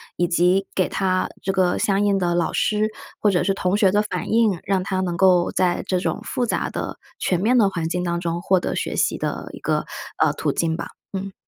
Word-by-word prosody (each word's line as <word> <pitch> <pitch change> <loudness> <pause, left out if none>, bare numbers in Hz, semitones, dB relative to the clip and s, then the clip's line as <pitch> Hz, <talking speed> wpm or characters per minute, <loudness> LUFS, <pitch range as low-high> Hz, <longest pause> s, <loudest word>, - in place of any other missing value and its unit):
以 175 - +1
及 180 +3 +3
给 185 - +1
他 185 -1 0 0.2
这 195 - 0
个 185 -2 +2
相 200 0 +1
应 200 -1 +3
的 175 -2 0
老 170 -1 0
师 215 0 +1 0.3
或 210 - +3
者 180 -3 +2
是 195 - +1
同 185 0 0
学 195 -3 +4
的 205 +1 +3
反 210 - -4
应， 220 -6 +3
让 195 -1 +1
他 190 0 -2
能 175 -2 -2
够 180 -2 +4
在 180 -1 +1
这 185 -1 0
种 - - -2
复 245 - -1
杂 - - -1
的、 - - -5 0.2
全 180 - +1
面 245 +4 +3
的 205 -4 +5
环 165 -3 -3
境 180 +1 -1
当 170 0 -1
中 170 0 -2
获 185 -1 +2
得 - - -2
学 - - -2
习 - - +1
的 - - -4
一 - - -10
个， - - -1 0.4
呃， - - +3
途 - - -2
径 165 -1 0
吧， - - -5 0.2
嗯。 195 0 -5
185 Hz, 250 characters per minute, -22 LUFS, 175-200 Hz, 0.4 s, 的